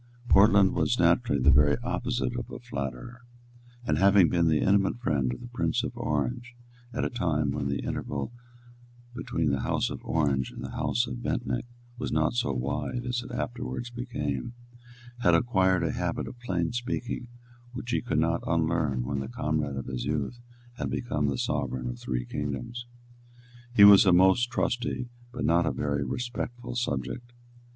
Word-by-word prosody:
Portland 100 -1 +6
was - - +1
naturally 70 - +3
the 70 +3 +5
very 70 +2 +5
opposite 125 0 -1
of 120 -1 -4
a - - -6
flatterer, 120 - -6 0.6
and, - - +1
having 95 -3 +6
been 85 -2 +2
the 80 -1 +3
intimate 100 +2 +2
friend 70 - 0
of 65 - -6
the 120 - -8
Prince 120 0 0
of 125 -1 -4
Orange 120 - -2 0.4
at - - -1
a - - 0
time 80 - 0
when 70 - -2
the 70 0 -2
interval 70 - -3 0.8
between 80 - -1
the 70 - 0
House - - 0
of - - -7
Orange 70 -5 +1
and - - -9
the - - -6
House - - 0
of - - -6
Bentinck 65 - -2 0.3
was 125 - -3
not 80 +4 +2
so 120 - 0
wide 70 - -2
as 125 0 -1
it 120 - -10
afterwards 120 0 -4
became, 115 - -4 0.7
had 90 -8 +4
acquired 95 -4 +2
a 80 - +1
habit - - -2
of 120 - -9
plain 90 -8 -1
speaking 120 0 -3 0.5
which 125 -1 -5
he - - +1
could 120 -11 -2
not 85 +2 +2
unlearn 80 -6 +1
when 70 +1 -2
the 65 - -4
comrade 75 +1 -1
of 65 - -4
his 65 -2 -4
youth 75 - -2 0.4
had - - -2
become 75 -11 -1
the 70 -2 -1
sovereign 65 0 -2
of - - -5
three - - -3
kingdoms. 75 - -4 0.9
He 100 - +8
was 100 0 +9
a - - +7
most 95 +7 +5
trusty, 125 0 -1 0.2
but - - -3
not 85 +2 +3
a - - +2
very 70 -1 -1
respectful, 120 - -4
subject. 120 0 -3
85 Hz, 175 wpm, -28 LUFS, -, 0.9 s, was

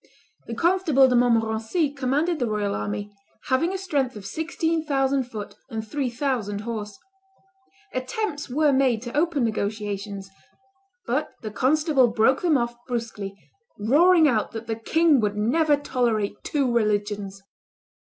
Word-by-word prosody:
The 230 - -4
Constable 330 -5 +4
de 250 - +2
Montmorency 230 +5 +2
commanded 290 +5 0
the 245 - 0
royal 210 -2 -1
army, 105 - -4 0.4
having 305 +7 +2
a 385 - -2
strength 285 -10 -1
of 205 -2 -9
sixteen 320 - -1
thousand 270 -3 +1
foot 215 -4 -7 0.2
and 220 -1 -5
three 275 +2 -2
thousand 235 -5 -2
horse. 210 -3 -5 1.0
Attempts 290 +4 -3
were 290 +2 +2
made 255 -4 +2
to 240 0 -7
open 305 -3 +1
negotiations; 205 -2 -3 0.7
but 260 +6 -1
the 215 - -4
constable 275 +2 +3
broke 230 +3 +2
them 330 -5 +3
off 235 -1 -2
brusquely, 225 -5 -4 0.4
roaring 315 - +5
out 225 -6 0
that 225 0 -6
the 225 - -2
king 310 +6 +3
would 210 -2 -1
never 290 +8 +3
tolerate 240 -7 0
two 275 -5 0
religions. 205 -3 -1
245 Hz, 140 wpm, -24 LUFS, 215-290 Hz, 1.0 s, roaring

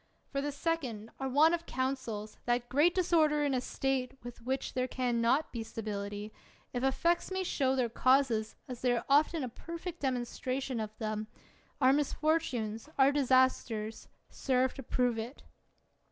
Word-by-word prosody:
For 275 - -1
the 290 +1 -2
second, 275 -8 -2
our 270 0 -2
want 305 +5 +5
of 335 0 -2
councils, 250 -5 -3
that 240 0 0
great 295 +7 +4
disorder 315 -5 +3
in 285 -2 +1
a 255 - +1
State 265 -1 -1
with 245 -1 -9
which 260 +3 -2
there 255 0 0
can 245 -2 0
not 260 +7 +2
be 235 - -3
stability, 205 -1 -5 0.4
if 245 0 -2
effects 335 +6 +2
may 375 0 -1
show 265 -6 +1
their 255 -2 +2
causes, 235 -2 +2
as 250 -2 -7
they 250 -1 +3
are 235 - -1
often 300 +2 +3
a - - -2
perfect 335 +7 -7
demonstration 255 0 -2
of 215 0 -5
them, 215 -1 -3 0.5
our 260 -1 +5
misfortunes, 285 -6 0
our 270 0 +6
disasters, 255 -5 +1 0.3
serve 260 -1 +2
to - - -7
prove 245 -3 0
it 235 +5 -7
260 Hz, 160 wpm, -32 LUFS, 235-285 Hz, 0.5 s, our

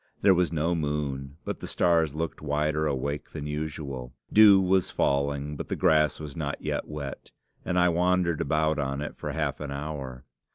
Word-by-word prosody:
There 100 -1 +7
was 90 -1 +1
no 80 +1 0
moon, 75 -3 -3
but - - -4
the - - -6
stars 80 -4 +2
looked 80 +1 -3
wider 75 +1 0
awake 70 0 -2
than 75 -2 -5
usual. 75 -4 -5 0.2
Dew 105 -2 +8
was 95 -1 +2
falling, 70 +1 0
but - - -6
the - - -2
grass 75 -2 +3
was 75 -3 -7
not 70 -3 -3
yet - - -3
wet, 75 -3 -7 0.3
and 90 - -1
I 90 0 +5
wandered 90 -1 +1
about 75 +1 +1
on 70 0 -2
it 75 - -5
for - - -5
half 75 -3 -2
an 75 - -5
hour. 70 -3 -6
75 Hz, 180 wpm, -27 LUFS, 70-80 Hz, 0.3 s, Dew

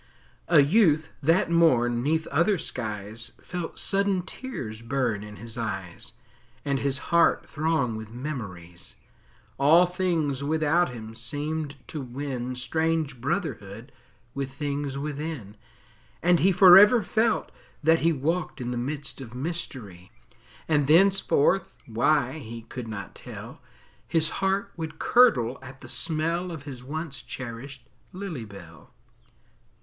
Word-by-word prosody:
A 160 -4 +7
youth, 160 -2 +3
that 165 +5 +3
morn, 120 -8 +3
'neath 160 +4 +1
other 170 +8 +2
skies, 110 -5 -4
Felt 175 -2 -6
sudden 195 -2 +1
tears 130 - -6
burn 115 -3 -1
in 105 0 -9
his 115 +2 -5
eyes, 95 -6 -5 0.5
And 140 -1 0
his 140 0 -2
heart 170 - +4
throng 155 -6 0
with 110 0 -7
memories; 100 - -7 0.6
All 160 +6 +6
things 170 -7 -1
without 160 +3 +2
him 110 -3 -8
seemed 145 +5 -4
to 155 - -5
win 130 -1 -4
Strange 155 +1 -1
brotherhood 125 - -3 0.4
with 135 -1 -4
things 140 -1 -3
within, 145 -7 -5 0.7
And 175 0 +4
he 195 - +4
forever 200 +5 +8
felt 225 +4 +1 0.3
that 160 +2 +5
he 165 - +3
Walked 160 +4 -2
in 125 -1 -3
the 125 - -3
midst 135 +2 -3
of 120 -2 -9
mystery, 125 - -5 0.6
And 150 -3 +2
thenceforth, 190 +1 +3
why, 130 +5 +1
he 115 -3 -8
could 125 0 -7
not 105 -3 -6
tell, - - -10 0.5
His 160 -1 +1
heart 195 +1 0
would 160 -1 -6
curdle 135 - +4
at 130 +1 -12
the 125 - -10
smell 165 +7 -2
Of 160 -4 -7
his 130 -4 -9
once 155 +1 -5
cherished 130 +1 -8 0.2
lily 180 - -6
bell. 85 -6 -14
140 Hz, 130 wpm, -26 LUFS, 120-165 Hz, 0.7 s, forever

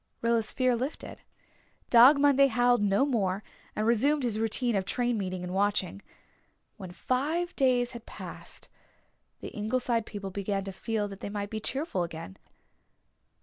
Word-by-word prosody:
Rilla's 230 -2 +2
fear 255 -2 +1
lifted. 260 +6 -5 0.7
Dog 250 +5 +8
Monday 280 -1 +5
howled 245 -1 +2
no 205 +5 +3
more 205 -7 -1 0.3
and 215 - -1
resumed 270 +6 +2
his 225 -3 -1
routine 225 +1 0
of 195 - +1
train 245 +5 -1
meeting 185 -3 -3
and 180 0 -5
watching. 200 -1 0 0.8
When 190 -4 -8
five 305 - -1
days 250 -3 +2
had 235 -2 -10
passed - - -10 0.7
the - - -6
Ingleside 230 +1 -1
people 200 -2 -6
began 200 0 -2
to 195 - -6
feel 215 +1 -2
that 195 -1 -10
they - - -5
might 205 0 -4
be 220 - -3
cheerful 270 - -2
again. 160 - -6
225 Hz, 150 wpm, -28 LUFS, 200-255 Hz, 0.8 s, Dog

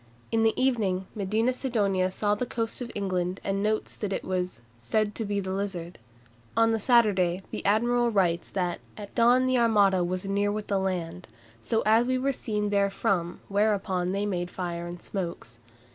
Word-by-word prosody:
In 225 -1 +2
the 225 0 +2
evening 210 -8 +1
Medina 215 +5 0
Sidonia 200 -8 0
saw 205 +2 0
the 240 +4 -2
coast 225 +1 -3
of 240 - -5
England, 185 -2 -1
and 195 0 -1
notes 215 +1 -1
that 205 -2 -3
it - - -2
was 185 -7 -2 0.2
"said 205 - -1
to 225 - -3
be 205 0 -1
the 190 -1 -3
Lizard." 185 -5 -4 0.6
On 225 0 +5
the 225 - +1
Saturday 195 -6 +3
the - - -4
admiral 240 +4 +3
writes 180 -6 +1
that 180 -3 -2 0.2
"at 205 -2 -9
dawn 245 +2 +4
the 255 -1 +2
Armada 200 -5 +4
was 180 +2 -2
near 200 +1 +1
with 210 0 -3
the 200 -1 0
land, 180 -2 -3 0.3
so 225 - 0
as 225 +3 +4
we 255 0 +1
were 270 +2 0
seen 210 -4 -2
therefrom, 195 -3 0
whereupon 195 -3 +1
they 200 +2 -1
made 175 -3 -2
fire 175 -2 -4
and 175 0 -8
smokes." 170 - -5
200 Hz, 180 wpm, -27 LUFS, 185-225 Hz, 0.6 s, On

